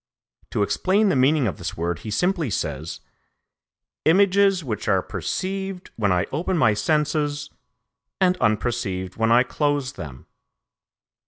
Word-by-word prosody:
To 105 - 0
explain 195 - +2
the - - +2
meaning 135 +2 +3
of 95 -9 -2
this - - -5
word 85 0 -2
he 110 - -7
simply 175 - 0
says: 75 -4 -4 1.0
"images 195 +1 +4
which 110 -7 -4
are - - +2
perceived 190 -1 -4
when 100 -4 +1
I 90 -1 +2
open 170 +5 -1
my 110 -9 +4
senses, 145 +5 0 0.7
and 185 -1 +3
unperceived 105 -4 -1
when 115 0 +2
I 120 +2 +6
close 145 -1 -1
them." 70 -8 -9
135 Hz, 135 wpm, -23 LUFS, -, 1.0 s, I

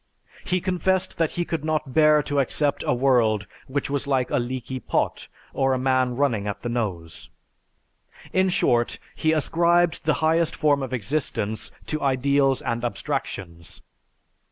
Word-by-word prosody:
He 185 0 0
confessed 185 0 0
that 165 -2 +2
he 175 - 0
could 165 -3 -3
not 155 -4 -2
bear 150 0 +5
to 145 0 -1
accept 145 +2 0
a - - +3
world 120 -5 +2 0.2
which 140 +1 -2
was 140 0 -2
like 130 -3 0
a - - +2
leaky 130 +1 -4
pot - - -2 0.3
or 135 0 +1
a - - -1
man 130 -1 +1
running 120 -7 0
at 100 - -5
the 120 - -2
nose. 95 -9 -4 1.0
In 190 0 +3
short, 120 -9 +1 0.2
he 155 - +1
ascribed 170 +2 +2
the 155 - +3
highest 165 0 +2
form 145 -2 +2
of 130 - -4
existence 110 -3 -2
to 155 - -3
ideals 135 0 +2
and 115 0 -2
abstractions. 90 -6 -5
135 Hz, 155 wpm, -24 LUFS, 120-155 Hz, 1.0 s, bear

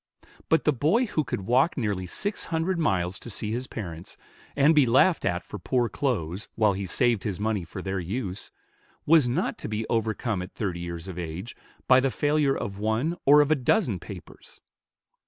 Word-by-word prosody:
But 160 - +3
the 150 - +3
boy 160 - +2
who 155 -8 -1
could 115 - -4
walk 130 - +2
nearly 105 -7 -2
six 200 - -2
hundred 165 +2 -1
miles 90 - 0
to - - -9
see 105 0 -4
his 125 +3 -3
parents, 85 -5 -7 0.4
and 145 +3 +5
be 145 -5 +5
laughed 135 +9 +4
at 90 -2 0
for 105 - -8
poor 120 +4 0
clothes, 100 - -2
while 105 -2 +3
he 95 0 -4
saved 120 +2 +2
his 100 -4 -3
money 105 -3 -1
for 90 +3 -8
their 95 0 -2
use, 95 +2 -4 0.6
was 155 -5 +5
not 155 +10 -1
to - - -6
be 110 +1 -2
overcome 110 -2 -1
at 90 - -9
thirty 95 -5 -3
years 85 0 -6
of 90 -2 -6
age, 90 +7 -6 0.3
by 130 0 +7
the 135 +1 +1
failure 145 0 +1
of 100 0 -5
one 110 +10 0
or 145 +1 +8
of 145 +1 +1
a - - +6
dozen 130 - +1
papers. 90 +1 -12
110 Hz, 190 wpm, -26 LUFS, 95-140 Hz, 0.6 s, or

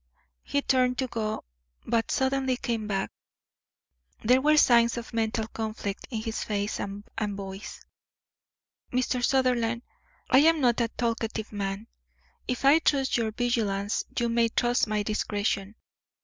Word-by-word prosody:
He 285 - -1
turned 255 -1 +2
to 260 - 0
go, 220 -3 -3 0.4
but 230 -1 0
suddenly 265 -1 +1
came 230 -4 -2
back. 195 -2 -1 1.1
There 250 +4 +4
were 305 +2 +4
signs 235 -4 +5
of 235 0 -7
mental 220 -1 0
conflict 215 -3 -4
in 225 -4 -3
his 225 -1 -3
face 205 -1 -2
and 200 0 -5 0.2
voice. 200 -2 -5 1.1
"Mr. 250 0 0
Sutherland, 245 -3 +2 0.4
I 260 - +6
am 320 +2 +5
not 245 -3 +3
a 230 - +2
talkative 225 -2 -3
man. 200 0 -3 0.6
If 250 +1 -2
I 285 +4 +7
trust 275 -4 +1
your 230 -2 +1
vigilance 215 -4 0
you 240 - +2
may 230 0 +2
trust 240 +1 +1
my 210 -1 0
discretion. 205 -1 -1
230 Hz, 135 wpm, -27 LUFS, 215-250 Hz, 1.1 s, I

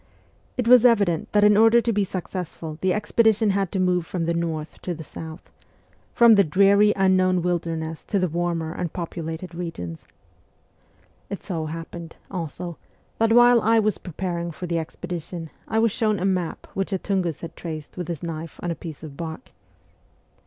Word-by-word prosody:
It 250 - 0
\vas 245 0 +7
evident 200 -9 +3
that 205 0 +4
in 210 0 +6
order 225 +2 +6
to 235 0 0
be 205 0 +2
successful 175 -4 -5
the 190 - +2
expedi 215 +2 +3
tion 215 -2 +2
had 195 -2 0
to 195 - -1
move 180 -1 +2
from 180 -3 -2
the 170 +1 0
north 165 -2 -3
to 175 - -3
the 160 - -8
south 160 +3 -9 0.6
from 235 -1 +7
the 200 -2 +6
dreary 200 +5 +5
unknown 185 -2 +3
wilderness 165 -2 -2
to 205 - 0
the 185 -1 +2
warmer 170 -1 -2
and 175 -3 -3
populated 165 0 -5
regions. 165 - -6 1.2
It 200 - -6
so 165 -4 -3
happened, 165 +1 -7 0.2
also, 175 -2 -5 0.4
that 225 0 +3
while 240 0 +7
I 225 +2 +4
was 215 -2 +1
preparing 170 -1 -4
for 170 +2 -6
the 170 -1 -1
expedition 170 0 -6 0.2
I 220 - -1
was 225 0 +3
shown 215 -1 +1
a 180 - -1
map 185 -3 -1
which 195 +1 -2
a 190 - +1
Tungus 185 -5 -2
had 165 0 -8
traced 155 -3 -7
with 180 -3 -5
his 170 -3 -5
knife 165 -1 -6
on 175 - -1
a - - -2
piece 160 -1 -9
of 150 -3 -8
bark. 165 - -7
180 Hz, 180 wpm, -24 LUFS, 165-200 Hz, 1.2 s, vas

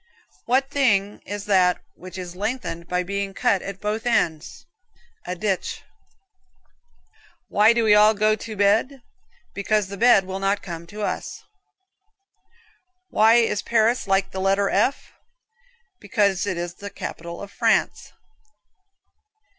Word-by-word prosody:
What 265 +3 +1
thing 205 -8 +1
is 205 0 -5
that 185 -3 +3
which 185 +1 -11
is 180 -1 -7
lengthened 195 -5 -4
by 180 0 -1
being 200 +1 -4
cut 195 - +1
at 195 -1 -7
both 215 +3 -3
ends? 165 -9 -1 0.6
A 180 - -3
ditch. 190 0 -3 1.7
Why 210 +2 +5
do 235 0 +1
we 215 -1 +5
all 210 +1 +6
go 215 +1 +2
to 220 0 -8
bed? 225 +6 +1 0.5
Because 200 0 0
the 200 - -7
bed 230 -3 +5
will 190 +1 -5
not 195 +1 0
come 170 -2 -7
to 210 +3 -7
us. - - -4 1.7
Why 225 +1 +4
Paris 230 0 +1
like 195 0 +1
the 190 - -4
letter 195 +1 +1
F? 240 +8 0 0.9
Because 200 -5 0
it 185 -3 -2
is 175 0 -4
the 200 +3 -9
capital 170 -3 -7
of 200 0 -9
France. - - 0
200 Hz, 130 wpm, -23 LUFS, 190-220 Hz, 1.7 s, all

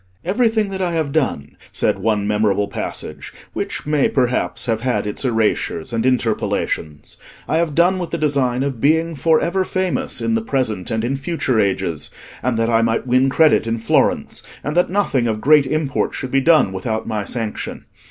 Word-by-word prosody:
"Everything 220 +2 +1
that 190 0 -4
I 175 -2 0
have 160 -4 -1
done," 130 - -1 0.2
said - - 0
one 105 0 0
memorable 105 -1 +1
passage, - - -5 0.2
which - - -4
may 150 -2 +2
perhaps 125 -9 0
have 115 -2 -1
had 125 -3 0
its 105 - -3
erasures 115 -5 0
and 115 +2 +1
interpolations, 105 - -1 0.3
"I 160 - +1
have 165 -3 0
done 180 +3 +3
with 175 - -4
the 170 - -2
design 135 -5 +1
of 135 -5 -3
being 160 +3 +2
for 160 +2 +3
ever 185 +3 0
famous 185 -1 -1
in 230 - 0
the 225 - +1
present 130 - -1
and 110 -1 -1
in 135 +3 -1
future 135 -5 -1
ages; 85 -7 -1 0.3
and 125 -2 0
that 115 0 +1
I 115 -1 +3
might 115 +1 0
win 130 +2 +3
credit 150 -3 +3
in 115 0 0
Florence; 115 - +1 0.2
and 150 +2 -3
that 175 - +3
nothing 175 -11 +1
of 110 -1 -1
great 145 +3 +5
import 155 -1 -1
should 130 - -5
be 135 - +3
done 155 - +4
without 110 +4 -3
my 110 -2 -2
sanction. 110 0 -4
130 Hz, 185 wpm, -19 LUFS, 110-160 Hz, 0.3 s, great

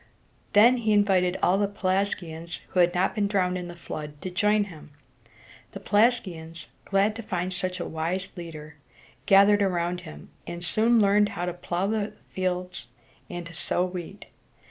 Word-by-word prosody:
Then 235 +5 +7
he 220 -3 +1
invited 190 -3 +3
all 190 +2 +4
the 205 - +2
Pelasgians 185 -4 -2
who 185 - -1
had 175 0 +4
not 180 +2 +2
been 210 -3 0
drowned 185 -3 +1
in 180 -1 -4
the 175 - -9
flood 150 -3 -7
to 185 - -4
join 210 +3 +2
him. 165 -7 -11 0.8
The 195 - -6
Pelasgians, 190 -7 0 0.2
glad 200 +2 +2
to - - -5
find 185 -3 -3
such 185 0 -3
a - - -3
wise 170 +4 -2
leader, 155 -4 -9 0.5
gathered 200 +1 +6
around 180 -2 0
him, 160 -3 -11 0.2
and 170 0 -6
they - - -7
soon 225 +6 +3
learned 205 0 +4
to 180 -3 -3
plow 175 +1 -2
the 210 0 -1 0.2
fields 180 -7 -3 0.4
and 175 -1 -6
to 170 - -10
sow 175 +2 -1
wheat. 180 +2 -7
185 Hz, 165 wpm, -26 LUFS, 175-205 Hz, 0.8 s, Then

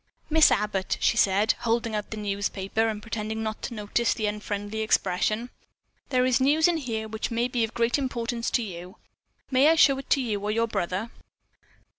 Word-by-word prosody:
"Miss 320 0 +6
Abbott," 200 -2 0
she - - +2
said, 200 +3 +3
holding 230 -1 0
out 210 -1 -3
the 215 - -6
newspaper, 200 +1 -1
and 210 -1 -4
pretending 220 -1 -4
not 215 -1 -4
to 235 - -5
notice 215 +2 0
the 215 - -2
unfriendly 210 0 -3
expression, 215 +2 0 0.6
"there 255 -2 +2
is 255 0 +2
news 300 +5 +4
in 345 -1 +1
here 225 -7 -4
which 220 0 -4
may 235 +1 0
be 245 -2 -1
of 225 - -4
great 235 +4 +1
importance 240 -2 -2
to 240 - 0
you. 180 -1 -8 0.5
May 265 +3 +5
I 325 - +5
show 275 -4 +5
it 270 - -10
to - - +4
your 215 0 -1
brother?" 195 +3 -3
220 Hz, 180 wpm, -26 LUFS, 210-245 Hz, 0.6 s, Miss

